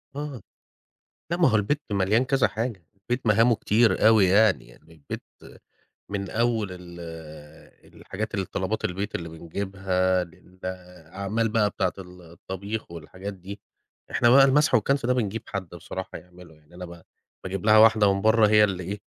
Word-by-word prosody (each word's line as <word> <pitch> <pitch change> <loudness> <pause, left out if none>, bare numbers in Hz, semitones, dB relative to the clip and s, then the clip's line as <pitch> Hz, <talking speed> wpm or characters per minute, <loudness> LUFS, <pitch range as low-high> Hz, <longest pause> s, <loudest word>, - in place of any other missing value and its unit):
آه. 145 -5 -6 0.9
لا 170 - 0
ما 175 -4 +4
هو 110 - +3
البيت 140 +9 0
مليان 100 +5 +2
كذا 135 0 +2
حاجة، 110 -7 -5
البيت 120 +6 -4
مهامه 115 +3 +4
كتير 110 +1 +2
أوي 110 -4 +5
يعني، 100 +1 +3
يعني - - -19
البيت 75 -3 -8 0.9
من 100 -1 -4
أول 115 -2 0
ال 90 -1 -11 0.9
الحاجات 110 +4 -6
الطلبات 95 +2 -3
البيت 100 +3 -3
اللي 85 -1 -4
بنجيبها 95 +2 -1
للأعمال 95 +4 -6
بقى 105 -1 +1
بتاعة 95 -2 -1
ال 90 -1 -12
الطبيخ 95 +5 -7
والحاجات 95 +4 -8
دي. 95 +2 -10 0.5
إحنا 120 - +3
بقى 135 +2 +8
المَسْح 145 +1 +3
والكَنْس 125 +3 +2
ده 125 - +2
بنجيب 115 -2 -2
حد 100 -4 -5
بصراحة 85 +3 -7
يعمله، 90 -2 -16
يعني 75 +2 -24
أنا 90 +1 -8
ب 85 -1 -12 0.4
باجيب 95 0 -4
لها 110 0 +7
واحدة 110 -2 +6
من 100 - -2
برّه 110 0 +4
هي 105 0 +6
اللي 95 -3 -2
إيه، 100 +4 -5
100 Hz, 155 wpm, -25 LUFS, 90-110 Hz, 0.9 s, بقى